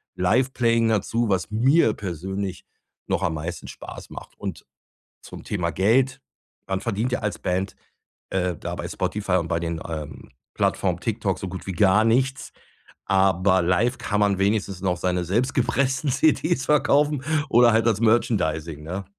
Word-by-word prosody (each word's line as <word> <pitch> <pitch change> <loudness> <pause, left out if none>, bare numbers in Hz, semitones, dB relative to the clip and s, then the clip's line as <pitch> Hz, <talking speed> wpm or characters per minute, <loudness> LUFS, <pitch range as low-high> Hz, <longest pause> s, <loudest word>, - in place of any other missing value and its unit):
Live 120 +9 +2
playing 115 -2 +2
dazu, 110 +2 0
was 95 +1 0
mir 125 +2 +4
persönlich 95 +1 -5 0.4
noch - - -1
am 80 - 0
meisten 80 +3 -6
Spaß - - -10
macht. - - -9
Und, - - -6 0.6
zum - - -11
Thema 90 -4 -2
Geld, 125 +7 +2 0.5
man 95 0 -1
verdient 115 +7 -2
ja - - 0
als 105 -2 -3
Band, 95 +1 -2 0.5
äh, 90 -3 -1
da - - -5
bei - - -5
Spotify 100 -3 -3
und 85 -2 -3
bei 85 - 0
den, 85 -1 -3
ähm, 75 -3 -7 0.2
Plattformen - - 0
TikTok - - -1
so 95 - -5
gut 95 +1 -8
wie 95 - -3
gar 95 +4 +4
nichts, 130 +4 +1 0.5
aber 95 -1 +3
live 90 +8 +1
kann 105 0 -1
man 100 -2 +2
wenigstens 100 -1 0
noch 90 -2 +1
seine 90 0 0
selbst 120 +9 0
gepressten 130 +2 +1
CDs 155 +1 +2
verkaufen 145 -1 +3 0.3
oder 120 0 +6
halt 110 +1 +2
das 110 -3 +2
Merchandising, 85 -9 +1
ne? 90 +5 -5
100 Hz, 160 wpm, -24 LUFS, 90-120 Hz, 0.6 s, oder